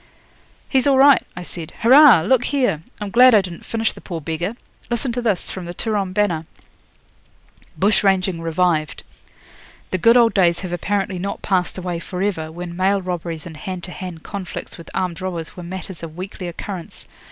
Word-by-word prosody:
'He's 265 0 +2
all 275 -1 +4
right,' 275 0 +7
I 180 - -6
said. 170 -2 -7
'Hurrah! 255 - +8
look 245 +8 +2
here. 255 - +1 0.2
I'm 205 -2 -5
glad 250 +1 +7
I 210 - +6
didn't 180 -3 -8
finish 225 -1 -1
the - - -13
poor 170 -4 -5
beggar. 165 +7 -3 0.3
Listen 240 +1 -1
to 245 +1 -2
this, 210 -7 0
from 185 -2 -6
the 175 +1 -7
"Turon 205 -3 -1
Banner": 180 -5 0 1.3
'BUSH 205 +6 +2
RANGING 190 -3 +2
REVIVED. 165 -2 0 0.9
'The 185 - +1
good 230 +6 +6
old 235 -2 +5
days 175 -3 +3
have 185 -2 -5
apparently 195 +1 -1
not 200 +2 -4
passed 185 -3 0
away 180 -2 -3
for 180 +2 -7
ever, 160 -6 -2
when 175 +1 -7
mail 195 +2 +2
robberies 175 -3 -4
and 165 -2 -8
hand 185 +2 -6
to 180 - -7
hand 180 -3 -7
conflicts 195 -4 -6
with 170 - -12
armed 185 -1 -2
robbers 170 -4 -5
were 180 - -8
matters 185 0 -7
of 165 -1 -8
weekly 185 0 -6
occurrence. 175 0 -7
185 Hz, 185 wpm, -21 LUFS, 170-210 Hz, 1.3 s, Hurrah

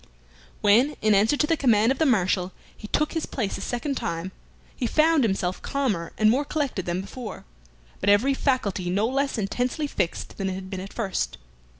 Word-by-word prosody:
When, 240 +9 +4
in 215 -1 +4
answer 215 +8 +3
to 300 - +3
the 330 - +2
command 235 -5 +3
of 270 - -2
the 315 - +3
Marshal, 185 -5 +1 0.2
he 210 - -9
took 300 +7 0
his 325 - -2
place 220 -7 -3
a - - -7
second 260 +3 -2
time, 185 -4 -3 0.4
he 245 - -1
found 310 +2 +4
himself 190 -4 -1
calmer 220 -12 -1
and 215 - +4
more 255 +6 +3
collected 285 - -2
than 175 +1 -1
before, 210 +2 -8 0.5
but 200 - +1
every 220 +7 +4
faculty 215 -10 0
no 200 +5 +1
less 275 +1 0
intensely 245 +8 -1
fixed 175 -11 -3
than 195 -1 -1
it - - -2
had 190 0 -8
been 190 - -4
at 195 +2 -7
first. 205 -5 -2
220 Hz, 195 wpm, -25 LUFS, 190-275 Hz, 0.5 s, When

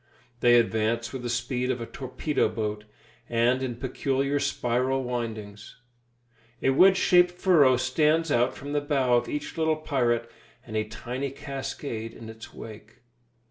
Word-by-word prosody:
They 120 0 +5
advance 115 +1 0
with 130 - -5
the 120 - -4
speed 125 +1 -1
of 130 -1 -1
a 115 - -4
torpedo 135 +4 -1
boat, 105 -1 -4 0.4
and 120 +2 +2
in 125 -2 -3
peculiar 135 +3 -1
spiral 130 -1 0
windings. 110 -4 -5 0.9
A 135 - +4
wedge 190 +7 +6
shaped 180 -1 +5
furrow 160 -8 +4
stands 155 +5 +2
out 120 0 +2
from 140 +1 -7
the 145 - +1
bow 140 -4 +1
of 120 - +1
each 150 +2 -4
little 160 0 +2
pirate, 120 -6 0 0.4
and 110 - -8
a 110 0 0
tiny 125 +5 -5
cascade 135 -4 -6
in 115 -1 -10
his 110 0 -11
wake. 110 +1 -11
125 Hz, 150 wpm, -26 LUFS, 115-140 Hz, 0.9 s, wedge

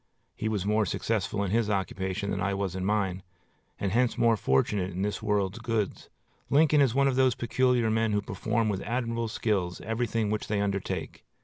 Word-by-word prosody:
He 110 - -2
was 105 -3 -1
more 105 0 +2
successful 105 -1 -1
in 95 - -2
his 115 -1 +1
occupation 95 0 -2
than 95 - -2
I 100 0 0
was 95 -2 -2
in 95 - -3
mine, 95 -2 0 0.6
and 100 - -1
hence 120 +2 +2
more 115 -1 +4
fortunate 90 +4 +1
in 95 +1 -3
this 105 0 -2
world's 105 -1 0
goods. 110 -3 -2 0.4
Lincoln 150 0 +5
is 130 -4 +3
one 140 0 +4
of 130 -1 0
those 130 -2 +4
peculiar 120 -1 +1
men 110 0 +1
who 105 0 +1
perform 110 +3 -1
with 100 -3 -1
admirable 115 0 -2
skill 105 -5 0
everything 115 -1 -1
which 110 - -2
they 105 -1 0
undertake. 100 -1 -3
105 Hz, 190 wpm, -28 LUFS, 100-115 Hz, 0.6 s, Lincoln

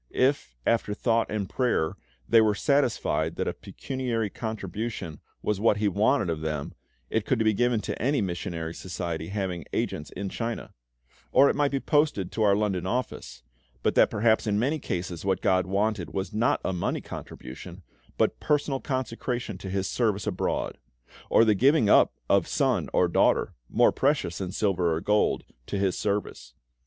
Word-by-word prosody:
If, 130 - +1
after 110 -3 +1
thought 115 0 +1
and 105 -3 -2
prayer, 105 -10 0 0.3
they 115 - +6
were 105 -1 +3
satisfied 120 - +1
that - - -2
a - - -1
pecuniary 120 -6 -3
contribution 110 -5 -5 0.2
was 105 -2 0
what 105 -1 +3
He 105 0 +1
wanted 105 +3 +2
of 80 -2 -2
them, 75 -2 -3 0.4
it 110 - +1
could 130 - +1
be 110 -1 +3
given 120 +1 +1
to - - -5
any 140 +4 +2
Missionary 85 -4 -3
Society 85 -3 -4
having 95 -3 -3
agents 75 - -2
in 100 0 -5
China; 115 +3 -4 0.6
or 140 +2 +6
it - - -5
might 145 -1 +2
be 140 - -1
posted 145 - +1
to 110 - -3
our 100 -2 +5
London 95 -4 -1
office; 65 - -4 0.4
but - - +2
that - - +5
perhaps 110 +1 +2
in 105 -1 +1
many 140 +8 +1
cases 90 - -4
what 95 -1 +1
GOD 95 -2 +2
wanted 100 -1 -1
was 95 +2 -3
not 110 +3 +2
a 95 - 0
money 85 - -1
contribution, 85 +9 -9 0.3
but - - +1
personal 145 -2 0
consecration 120 -6 -3
to 95 - -6
His 95 0 -1
service 105 -1 0
abroad; 100 -4 -2 0.5
or 115 - +5
the 110 - +5
giving 125 0 +4
up - - +6 0.2
of - - +3
son - - +1
or 90 - +3
daughter 85 - +2 0.2
more - - +4
precious 135 - 0
than 95 -2 -3
silver 90 -5 +1
or - - -1
gold 105 +4 +1 0.2
to 100 - -2
His 95 -2 +1
service. 100 - -3
105 Hz, 170 wpm, -27 LUFS, 90-115 Hz, 0.6 s, they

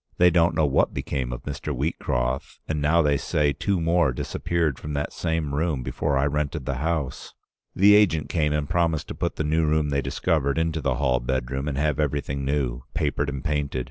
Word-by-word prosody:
They 90 0 +6
don't 85 -1 +3
know 80 - +3
what 70 -1 +2
became 65 -4 -3
of - - -6
Mr. 75 +1 -4
Wheatcroft, 65 -3 -2
and 75 -2 -2
now 80 +3 +3
they 75 -1 +3
say 75 +2 +1
two 90 +7 -1
more 85 -3 +2
disappeared 80 +3 -1
from 75 - -6
that 75 0 -2
same 80 -4 -2
room 75 -3 0
before 70 +3 -1
I 70 - +2
rented 75 -1 -2
the 65 0 -2
house. 75 -3 -3 0.4
The 100 +2 +6
agent 90 -8 +4
came 75 -3 0
and 75 -1 -1
promised 85 -2 0
to - - -3
put - - -2
the - - -2
new 80 +2 +1
room 75 -1 +1
they 70 0 +1
discovered 70 +1 0
into 80 -1 0
the 65 -2 0
hall 65 -2 +1
bedroom 65 +2 -2
and 70 -2 -2
have 75 0 0
everything 70 -2 -1
new 65 -3 -1
— - - -34
papered 75 -1 0
and 70 -2 -5
painted. 75 -4 -1
75 Hz, 205 wpm, -25 LUFS, 70-80 Hz, 0.4 s, They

